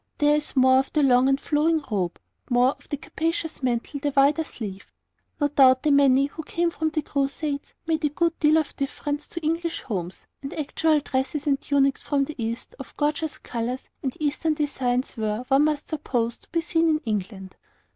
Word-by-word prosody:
There 295 Hz, 0 st, +4 dB
is 300 Hz, 0 st, -2 dB
more 260 Hz, 0 st, +6 dB
of 270 Hz, -, -2 dB
the 300 Hz, -, +3 dB
long 255 Hz, 0 st, +5 dB
and 270 Hz, 0 st, +2 dB
flowing 315 Hz, +2 st, +2 dB
robe, 185 Hz, -4 st, -1 dB, 0.3 s
more 245 Hz, +1 st, +4 dB
of -, -, -16 dB
the 290 Hz, -, -2 dB
capacious 320 Hz, +2 st, -3 dB
mantle, 250 Hz, +2 st, -1 dB
the 290 Hz, -, 0 dB
wider 285 Hz, +4 st, +4 dB
sleeve. 200 Hz, -9 st, -8 dB, 0.5 s
No 290 Hz, -, +3 dB
doubt 260 Hz, -2 st, +5 dB
the 300 Hz, -, +3 dB
many 275 Hz, -1 st, +5 dB
who 290 Hz, +3 st, -7 dB
came 340 Hz, +2 st, -1 dB
from 315 Hz, -1 st, -1 dB
the 310 Hz, -1 st, -2 dB
Crusades 280 Hz, +1 st, -2 dB
made 320 Hz, -1 st, 0 dB
a 300 Hz, -, +3 dB
good 335 Hz, +3 st, 0 dB
deal 305 Hz, 0 st, +5 dB
of 310 Hz, -2 st, -1 dB
difference 290 Hz, +1 st, -3 dB
to 335 Hz, -, -6 dB
English 330 Hz, +2 st, -1 dB
homes, 185 Hz, -6 st, -5 dB, 0.2 s
and 275 Hz, -, -6 dB
actual 310 Hz, 0 st, +1 dB
dresses 275 Hz, +2 st, -2 dB
and 280 Hz, -2 st, +1 dB
tunics 275 Hz, -1 st, +2 dB
from 285 Hz, -2 st, +1 dB
the 310 Hz, -, -7 dB
East, 230 Hz, +1 st, -4 dB
of 270 Hz, -, -10 dB
gorgeous 300 Hz, 0 st, -1 dB
colours 240 Hz, +2 st, -4 dB, 0.2 s
and 265 Hz, -2 st, -3 dB
Eastern 305 Hz, +1 st, 0 dB
designs, 260 Hz, -5 st, -1 dB
were, 215 Hz, +2 st, -2 dB
one 275 Hz, +2 st, +5 dB
must 300 Hz, -1 st, -1 dB
suppose, 240 Hz, -7 st, -2 dB
to -, -, -23 dB
be 335 Hz, -, 0 dB
seen 330 Hz, 0 st, +1 dB
in 310 Hz, -, +3 dB
England. 195 Hz, -3 st, -4 dB
285 Hz, 195 wpm, -25 LUFS, 255-305 Hz, 0.5 s, more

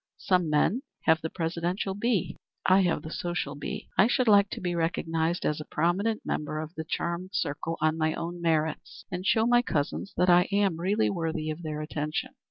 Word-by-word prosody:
Some 180 Hz, -4 st, +1 dB
men 150 Hz, -, +2 dB, 0.2 s
have 160 Hz, 0 st, +4 dB
the 160 Hz, -, -3 dB
presidential 175 Hz, +4 st, -2 dB
bee; 205 Hz, -1 st, 0 dB, 0.3 s
I 190 Hz, +1 st, +6 dB
have 170 Hz, -4 st, +1 dB
the 155 Hz, -, -7 dB
social 175 Hz, -5 st, -3 dB
bee. 145 Hz, 0 st, -6 dB
I 195 Hz, -, +7 dB
should 250 Hz, 0 st, +1 dB
like 200 Hz, -2 st, +6 dB
to -, -, -5 dB
be 175 Hz, -1 st, -2 dB
recognized 165 Hz, 0 st, -1 dB
as 150 Hz, 0 st, 0 dB
a -, -, -8 dB
prominent 195 Hz, +7 st, 0 dB
member 150 Hz, 0 st, -2 dB
of 155 Hz, +1 st, -6 dB
the 160 Hz, -, -5 dB
charmed 170 Hz, +3 st, -3 dB
circle 165 Hz, +3 st, -2 dB
on 155 Hz, +1 st, +2 dB
my 155 Hz, 0 st, +1 dB
own 175 Hz, +1 st, -5 dB
merits 160 Hz, -2 st, -1 dB
and 180 Hz, 0 st, -3 dB
show 220 Hz, 0 st, +4 dB
my 240 Hz, 0 st, +5 dB
cousins 155 Hz, -1 st, -2 dB
that 180 Hz, -, +3 dB
I 180 Hz, +1 st, +6 dB
am 200 Hz, -4 st, +2 dB
really 200 Hz, +5 st, +1 dB
worthy 160 Hz, -3 st, -2 dB
of 155 Hz, +2 st, -6 dB
their 155 Hz, -2 st, -4 dB
attention. 155 Hz, +10 st, -3 dB
170 Hz, 195 wpm, -28 LUFS, 155-190 Hz, 0.3 s, I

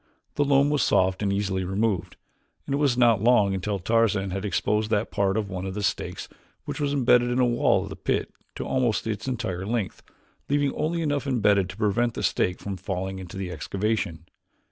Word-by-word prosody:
The 145 Hz, -, +1 dB
loam 140 Hz, 0 st, +3 dB
was 150 Hz, -, +2 dB
soft 95 Hz, +1 st, +2 dB
and 100 Hz, -2 st, +1 dB
easily 100 Hz, -1 st, -1 dB
removed, 95 Hz, -1 st, -1 dB, 0.5 s
and -, -, -3 dB
it 140 Hz, -, +1 dB
was 140 Hz, -5 st, +2 dB
not 115 Hz, -5 st, +4 dB
long 110 Hz, -4 st, +4 dB
until 100 Hz, +2 st, -2 dB
Tarzan 105 Hz, -1 st, +1 dB
had 95 Hz, +2 st, -3 dB
exposed 105 Hz, +3 st, 0 dB
that 110 Hz, 0 st, 0 dB
part 100 Hz, 0 st, +1 dB
of 105 Hz, -2 st, -1 dB
one 95 Hz, 0 st, -5 dB
of 95 Hz, -, -5 dB
the 105 Hz, -, -3 dB
stakes -, -, -2 dB, 0.4 s
which -, -, -5 dB
was 145 Hz, -1 st, 0 dB
imbedded 125 Hz, -3 st, +4 dB
in 125 Hz, -, 0 dB
the 130 Hz, -, +4 dB
wall 120 Hz, -1 st, +2 dB
of -, -, -7 dB
the -, -, -7 dB
pit -, -, -2 dB, 0.2 s
to -, -, -4 dB
almost 125 Hz, -4 st, 0 dB
its 110 Hz, +2 st, -3 dB
entire 95 Hz, -8 st, -3 dB
length, 110 Hz, -1 st, -2 dB, 0.5 s
leaving 145 Hz, -1 st, +1 dB
only 165 Hz, +2 st, -1 dB
enough 145 Hz, -2 st, -1 dB
imbedded 100 Hz, -7 st, +2 dB
to 95 Hz, -, -9 dB
prevent 110 Hz, +3 st, +1 dB
the -, -, -4 dB
stake 90 Hz, -, +1 dB
from 100 Hz, -1 st, -5 dB
falling 95 Hz, 0 st, -4 dB
into 95 Hz, 0 st, -8 dB
the 95 Hz, -2 st, -4 dB
excavation. 95 Hz, 0 st, -2 dB
105 Hz, 205 wpm, -25 LUFS, 95-120 Hz, 0.5 s, not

